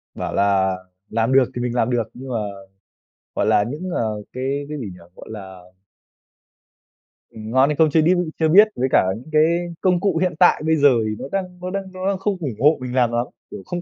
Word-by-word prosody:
Bảo - - -4
là 95 -1 +2 0.3
làm 115 +3 0
được 135 0 +6
thì 120 - -3
mình 120 0 -2
làm 120 -1 +1
được 120 -3 -1
nhưng 130 +2 -9
mà, 120 - -2 1.0
gọi - - 0
là, 105 - +3
những, 160 +8 -5
ờ, 110 -2 -2
cái 135 +3 -3
cái 150 - -5
gì 125 - -5
nhỉ? 90 - -15 0.2
Gọi - - -12
là 95 -4 -9 1.7
Ừm, 110 0 -9
ngon 130 +3 +4
hay 150 - 0
không 160 +1 +4
chưa 160 - +4
điu 175 +2 +2
chưa 160 - +3
biết 205 +6 +7
với 130 - 0
cả - - +5
những 125 +8 -11
cái 155 0 +4 0.4
công 180 -2 +2
cụ 190 -3 0
hiện 180 -2 0
tại 180 - +5
bây 160 0 +3
giờ 145 -2 +5 0.2
thì 110 0 -2
nó - - -6
đang 180 -2 -4
nó 180 - -4
đang 195 0 -5
nó 185 +1 -4
đang 195 -1 0
không 195 +1 -2
ủng 140 -9 -4
hộ 150 +5 +4
mình 125 0 -5
làm 125 -2 +2
lắm, 120 +1 0 0.3
kiểu - - -8
không 175 0 -4
135 Hz, 230 wpm, -21 LUFS, 115-175 Hz, 1.7 s, biết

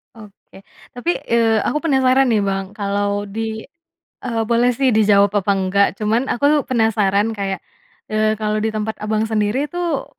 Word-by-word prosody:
Oke, 205 -2 -16 0.3
tapi, 290 +8 -1 0.2
eee, 225 -2 +2
aku - - 0
penasaran 265 -3 +3
nih, 220 - +3
Bang, 195 -1 -2
kalau 205 0 -1
di 220 +2 -5 0.5
eee, 230 -3 -2
boleh 240 +2 +2
sih 265 -2 +2
dijawab 205 -2 +4
apa 200 - -2
nggak, 195 +1 +2
cuman 225 +5 0
aku 285 +3 +1
penasaran 220 -3 +1
kayak, 195 -3 -4 0.5
eee, 215 0 +1
kalau 215 0 -1
di 220 - 0
tempat 220 0 -4
Abang 215 +1 -1
sendiri 220 +4 0
tuh 340 -6 -2
220 Hz, 155 wpm, -19 LUFS, 205-240 Hz, 0.5 s, dijawab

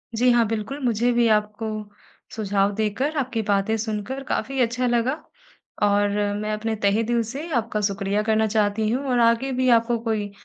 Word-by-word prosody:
जी 250 +3 +3
हाँ, 240 -1 +4
बिल्कुल 225 +6 -4
मुझे 240 +1 +2
भी 240 -1 +3
आपको 210 +1 -3 0.7
सुझाव 200 -2 +1
देकर 220 +9 -1
आपकी 255 -4 -1
बातें 200 +2 +1
सुनकर 220 +5 -4
काफ़ी 270 0 -2
अच्छा 250 +1 +1
लगा। 240 +2 +1 0.7
और 205 0 +3 0.3
मैं 215 0 -2
अपने 220 +1 -2
तहे 200 +3 +3
दिल 235 +1 +1
से 290 +5 -6
आपका 225 -2 -1
शुक्रिया 200 0 0
करना 220 0 +2
चाहती 215 0 +1
हूँ, 255 +5 -1
और 245 -1 +2
आगे 235 +3 +3
भी 255 0 +1
आपको 235 0 +3
कोई 215 -3 -2
225 Hz, 170 wpm, -23 LUFS, 210-245 Hz, 0.7 s, हाँ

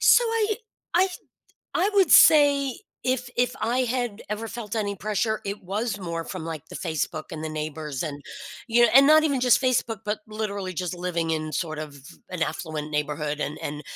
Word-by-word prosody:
so, - - +6
I 445 -2 0 0.4
I 370 +2 +4 0.7
I 380 +4 +2
would 385 -5 +4
say, 285 -3 +6 0.3
if 255 -1 -1
if 245 +1 +1
I 235 +4 +1
had 245 -3 -2
ever 215 +2 -4
felt 220 -2 -6
any 205 -2 -1
pressure, 215 +2 -1
it 200 0 -5
was 205 +3 -2
more 170 -2 -4
from, 185 -2 -6
like, 160 -2 -6
the - - -11
Facebook 160 -2 -3
and 155 0 -6
the - - -2
neighbors 155 -2 -4
and, 145 -3 -5 0.4
you 240 0 +4
know 240 - +7
and 270 +3 +8
not 310 +1 +7
even 285 -4 +1
just 250 +1 +4
Facebook, 235 -3 +1
but 210 0 -1
literally 205 -3 -4
just 180 +1 -3
living 175 -2 -2
in 155 -1 -2
sort 155 -3 -2
of 150 -2 -7 0.3
an 180 -3 -3
affluent 155 -3 -3
neighborhood 150 0 -2
and 150 0 -3
and 150 +1 -5
205 Hz, 190 wpm, -25 LUFS, 160-245 Hz, 0.7 s, and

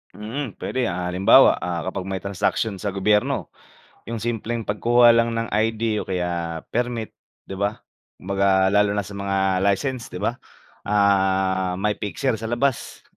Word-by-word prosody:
Mm, 115 +3 -5
puwede, 130 -2 -2
ah, 90 0 -3
halimbawa, 95 +2 +6
ah, 85 -2 -3
kapag 95 0 -4
may 95 -1 -4
transaksiyon 100 +1 -1
sa 100 -1 -4
gobyerno, 105 +2 +1 0.6
'yung 115 0 -4
simpleng 115 0 -2
pagkuha 120 +4 +4
lang 115 0 +2
ng 115 0 -2
ID 110 0 0
o - - -20
kaya 85 -3 -3
permit 120 -2 -2 0.3
'di 95 - -8
ba, 100 +1 0 0.4
kumbaga 95 0 +1
lalo 105 0 +3
na 105 - 0
sa 100 - -11
mga 95 -1 0
license 120 +5 -1
'di 90 - -8
ba, 120 +4 -1 0.5
ah, 95 -2 +2
may 105 +2 -1
fixer 110 +3 -2
sa 115 - -5
labas. 120 +3 -2
100 Hz, 155 wpm, -23 LUFS, 95-115 Hz, 0.6 s, halimbawa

